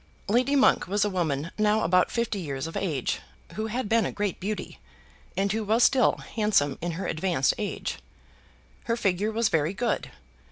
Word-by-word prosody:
Lady 250 Hz, +7 st, +2 dB
Monk 270 Hz, -, +4 dB
was 205 Hz, +2 st, +1 dB
a 205 Hz, -, -1 dB
woman 165 Hz, -3 st, -1 dB
now 215 Hz, +1 st, +3 dB
about 180 Hz, +2 st, +3 dB
fifty 235 Hz, -3 st, -1 dB
years 140 Hz, -5 st, -4 dB
of 165 Hz, -, -7 dB
age, 150 Hz, -10 st, -1 dB, 0.3 s
who 220 Hz, +1 st, -3 dB
had 235 Hz, +1 st, -2 dB
been 225 Hz, +1 st, +3 dB
a -, -, -2 dB
great 205 Hz, -3 st, -2 dB
beauty, 210 Hz, +3 st, -4 dB, 0.6 s
and 195 Hz, +1 st, +1 dB
who 220 Hz, +1 st, -1 dB
was 220 Hz, +3 st, +3 dB
still 260 Hz, -3 st, +5 dB, 0.2 s
handsome 210 Hz, -11 st, +2 dB
in 170 Hz, 0 st, -2 dB
her 185 Hz, +4 st, -4 dB
advanced 160 Hz, -4 st, +1 dB
age. 205 Hz, -2 st, -3 dB, 0.9 s
Her 230 Hz, 0 st, 0 dB
figure 200 Hz, 0 st, 0 dB
was 225 Hz, 0 st, +1 dB
very 160 Hz, +4 st, +1 dB
good. 240 Hz, +4 st, -1 dB
205 Hz, 175 wpm, -27 LUFS, 170-220 Hz, 0.9 s, still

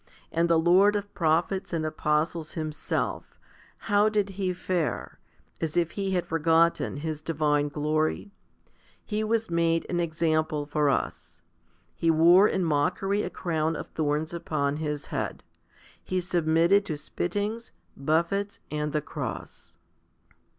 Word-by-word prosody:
And 170 Hz, +1 st, +1 dB
the 165 Hz, -, +5 dB
Lord 185 Hz, +5 st, +5 dB
of 205 Hz, 0 st, -3 dB
prophets 170 Hz, +2 st, 0 dB
and 165 Hz, -2 st, -1 dB
apostles 155 Hz, +1 st, -1 dB
Himself, 155 Hz, -2 st, -3 dB, 0.5 s
how 205 Hz, 0 st, +4 dB
did 210 Hz, -2 st, 0 dB
He 190 Hz, -1 st, -2 dB
fare, 180 Hz, -3 st, -2 dB, 0.4 s
as 160 Hz, +1 st, -2 dB
if 170 Hz, -1 st, +2 dB
He 195 Hz, -1 st, -2 dB
had 180 Hz, -1 st, 0 dB
forgotten 165 Hz, -1 st, +2 dB
His 155 Hz, 0 st, -4 dB
divine 150 Hz, -2 st, +1 dB
glory? 155 Hz, +6 st, -1 dB, 0.7 s
He 215 Hz, 0 st, -1 dB
was 220 Hz, -2 st, 0 dB
made 165 Hz, -1 st, +2 dB
an 175 Hz, -, 0 dB
example 155 Hz, -2 st, 0 dB
for 150 Hz, 0 st, +1 dB
us; -, -, -3 dB, 0.5 s
He 165 Hz, -, 0 dB
wore 170 Hz, +5 st, +6 dB
in 190 Hz, -, 0 dB
mockery 170 Hz, +7 st, +1 dB
a -, -, -3 dB
crown 160 Hz, -2 st, -1 dB
of -, -, -6 dB
thorns 155 Hz, +1 st, -1 dB
upon 150 Hz, -4 st, -1 dB
His 150 Hz, -2 st, -3 dB
head; -, -, -3 dB, 0.6 s
He 185 Hz, -, -1 dB
submitted 175 Hz, +2 st, +3 dB
to 155 Hz, -6 st, -3 dB
spittings, 205 Hz, +9 st, -3 dB, 0.2 s
buffets, 170 Hz, +8 st, 0 dB
and 150 Hz, -1 st, -2 dB
the 150 Hz, -, +1 dB
cross. -, -, -7 dB
165 Hz, 135 wpm, -27 LUFS, 155-185 Hz, 0.7 s, wore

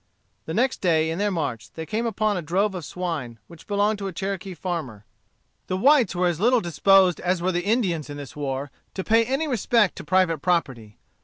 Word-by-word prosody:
The 160 Hz, -, -3 dB
next 255 Hz, +3 st, +1 dB
day, 160 Hz, -3 st, +2 dB
in 165 Hz, -, -3 dB
their 205 Hz, 0 st, +1 dB
march, 150 Hz, -, -3 dB
they 160 Hz, -, -6 dB
came 225 Hz, +8 st, -2 dB
upon 215 Hz, -1 st, 0 dB
a 180 Hz, -, -2 dB
drove 190 Hz, +6 st, 0 dB
of 180 Hz, -3 st, -5 dB
swine, 155 Hz, -9 st, -4 dB
which 170 Hz, -2 st, -15 dB
belonged 205 Hz, +1 st, +1 dB
to 195 Hz, -, -3 dB
a -, -, -4 dB
Cherokee 190 Hz, 0 st, -4 dB
farmer. 155 Hz, -, -5 dB, 0.6 s
The 185 Hz, -, -1 dB
whites 255 Hz, -3 st, +4 dB
were 180 Hz, +1 st, +1 dB
as 175 Hz, -2 st, 0 dB
little 245 Hz, +4 st, +4 dB
disposed 185 Hz, 0 st, +4 dB
as 180 Hz, 0 st, 0 dB
were 180 Hz, +2 st, 0 dB
the 175 Hz, 0 st, -1 dB
Indians, 190 Hz, -, 0 dB
in 145 Hz, -, -6 dB
this 140 Hz, -3 st, -9 dB
war, 140 Hz, -1 st, -4 dB, 0.2 s
to 190 Hz, -, -3 dB
pay 225 Hz, +3 st, +4 dB
any 270 Hz, +7 st, -1 dB
respect 235 Hz, -5 st, +2 dB
to -, -, -7 dB
private 165 Hz, -1 st, +2 dB
property. 135 Hz, -, -1 dB
180 Hz, 210 wpm, -24 LUFS, 160-205 Hz, 0.6 s, whites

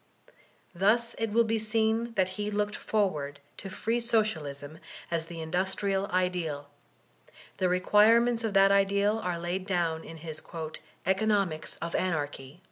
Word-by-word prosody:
Thus 215 Hz, +6 st, +2 dB
it 225 Hz, -1 st, -1 dB
will 235 Hz, +2 st, +4 dB
be 225 Hz, 0 st, 0 dB
seen 220 Hz, +1 st, 0 dB
that 190 Hz, -2 st, +2 dB
he 205 Hz, +2 st, -3 dB
looked 210 Hz, 0 st, -1 dB
forward 150 Hz, -10 st, -1 dB, 0.2 s
to 195 Hz, -, -7 dB
free 225 Hz, +5 st, -1 dB
Socialism 160 Hz, -, -1 dB, 0.3 s
as 165 Hz, -1 st, -1 dB
the 165 Hz, -1 st, -7 dB
industrial 190 Hz, +4 st, 0 dB
ideal; 175 Hz, -6 st, -1 dB, 0.9 s
the 185 Hz, -, +1 dB
requirements 225 Hz, +6 st, +4 dB
of 215 Hz, -3 st, -2 dB
that 195 Hz, 0 st, +6 dB
ideal 200 Hz, +2 st, +3 dB
are 180 Hz, -5 st, -2 dB
laid 175 Hz, +3 st, -3 dB
down 170 Hz, -4 st, 0 dB
in 165 Hz, -, -9 dB
his 160 Hz, -1 st, -7 dB, 0.6 s
"Economics 190 Hz, -4 st, +1 dB
of 170 Hz, -, -4 dB
Anarchy." 145 Hz, -4 st, -2 dB
190 Hz, 135 wpm, -29 LUFS, 165-215 Hz, 0.9 s, that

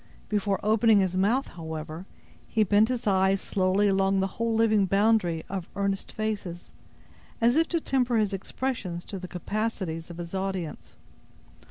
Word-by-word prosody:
Before 205 Hz, -2 st, 0 dB
opening 220 Hz, 0 st, +4 dB
his 185 Hz, -2 st, +1 dB
mouth, 220 Hz, +9 st, +2 dB
however, 160 Hz, +1 st, -7 dB, 0.4 s
he 220 Hz, -, +2 dB
bent 210 Hz, +3 st, +4 dB
his 250 Hz, -1 st, -2 dB
eyes 190 Hz, -1 st, +3 dB
slowly 190 Hz, +2 st, +1 dB
along 195 Hz, 0 st, +2 dB
the 190 Hz, -, +2 dB, 0.2 s
whole 230 Hz, -1 st, +1 dB
living 215 Hz, -3 st, +3 dB
boundary 195 Hz, -5 st, +2 dB
of 190 Hz, -3 st, -5 dB
earnest 200 Hz, -1 st, -2 dB
faces, 205 Hz, -5 st, -4 dB, 0.7 s
as 235 Hz, +2 st, +4 dB
if 325 Hz, +1 st, +3 dB
to 335 Hz, -, 0 dB
temper 250 Hz, -5 st, +1 dB
his 210 Hz, -2 st, +1 dB
expressions 195 Hz, -4 st, -3 dB
to 195 Hz, -, -6 dB
the 180 Hz, -, -7 dB
capacities 185 Hz, -3 st, -3 dB
of 170 Hz, -, -9 dB
his 170 Hz, 0 st, -7 dB
audience. 180 Hz, -, -4 dB
195 Hz, 155 wpm, -27 LUFS, 180-220 Hz, 0.7 s, opening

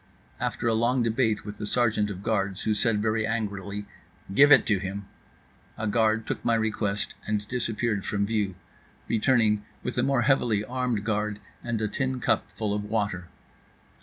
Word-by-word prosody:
After -, -, -2 dB
a 115 Hz, -, +3 dB
long 120 Hz, +3 st, +2 dB
debate 115 Hz, -2 st, +1 dB
with 105 Hz, 0 st, -7 dB
the 105 Hz, -, -4 dB
sergeant 110 Hz, -3 st, +2 dB
of 100 Hz, -1 st, -6 dB
guards 100 Hz, -4 st, 0 dB
who 110 Hz, -, +2 dB
said 105 Hz, 0 st, +1 dB
very 110 Hz, 0 st, +1 dB
angrily: 105 Hz, -2 st, -3 dB, 0.5 s
"Give 145 Hz, +7 st, +7 dB
it -, -, +8 dB
to 100 Hz, -3 st, +2 dB
him," 100 Hz, +1 st, -5 dB, 0.7 s
a 110 Hz, -, -3 dB
guard 110 Hz, 0 st, +2 dB
took -, -, -4 dB
my 115 Hz, -, +3 dB
request 105 Hz, -2 st, -1 dB
and 105 Hz, -1 st, -1 dB
disappeared 115 Hz, -4 st, -1 dB
from 100 Hz, -1 st, 0 dB
view, 105 Hz, -3 st, -1 dB, 0.5 s
returning 110 Hz, -2 st, +2 dB, 0.2 s
with 125 Hz, 0 st, -2 dB
a -, -, +4 dB
more 135 Hz, -1 st, +2 dB
heavily 110 Hz, -4 st, +2 dB
armed 125 Hz, -3 st, -1 dB
guard 105 Hz, -1 st, -1 dB, 0.3 s
and 120 Hz, -2 st, -2 dB
a -, -, +2 dB
tin 130 Hz, +3 st, -2 dB
cup -, -, +1 dB
full 105 Hz, -2 st, -1 dB
of 105 Hz, 0 st, -2 dB
water. 100 Hz, -4 st, -2 dB
110 Hz, 170 wpm, -27 LUFS, 105-115 Hz, 0.7 s, it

